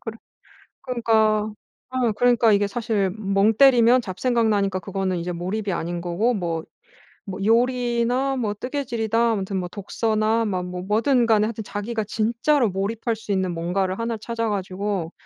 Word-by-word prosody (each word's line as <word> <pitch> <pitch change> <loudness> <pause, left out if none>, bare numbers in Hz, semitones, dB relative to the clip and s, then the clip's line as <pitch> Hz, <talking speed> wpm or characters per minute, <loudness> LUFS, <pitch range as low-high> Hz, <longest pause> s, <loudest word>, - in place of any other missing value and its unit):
그래 225 -1 -7 0.7
그러니까 220 -4 +1 0.4
어 255 -3 0
그러니까 240 -2 +4
이게 200 0 +2
사실 215 -3 -1
멍 200 +1 +2
때리면 245 0 +5
잡생각 230 +4 0
나니까 195 -3 +1
그거는 190 -1 -2
이제 175 +1 -3
몰입이 190 +4 -3
아닌 170 +1 -3
거고 190 +8 0
뭐 170 -5 -2 0.7
뭐 190 +1 -5
요리나 245 +3 +1
뭐 215 -4 -1
뜨개질이다 235 -2 -1
아무튼 195 -2 -2
뭐 180 -1 -2
독서나 215 +3 0
막 185 -4 -2
뭐 180 0 -6
뭐든 230 +5 +2
간에 215 -2 +4
하여튼 220 -1 -5
자기가 215 +2 -3
진짜로 235 +5 +1
몰입할 220 +4 -2
수 215 -2 -5
있는 190 -2 0
뭔가를 185 +3 -1
1 230 0 -2
를 - - -6
찾아 230 -1 -2
가지고 195 -3 -3
215 Hz, 335 characters per minute, -23 LUFS, 195-235 Hz, 0.7 s, 때리면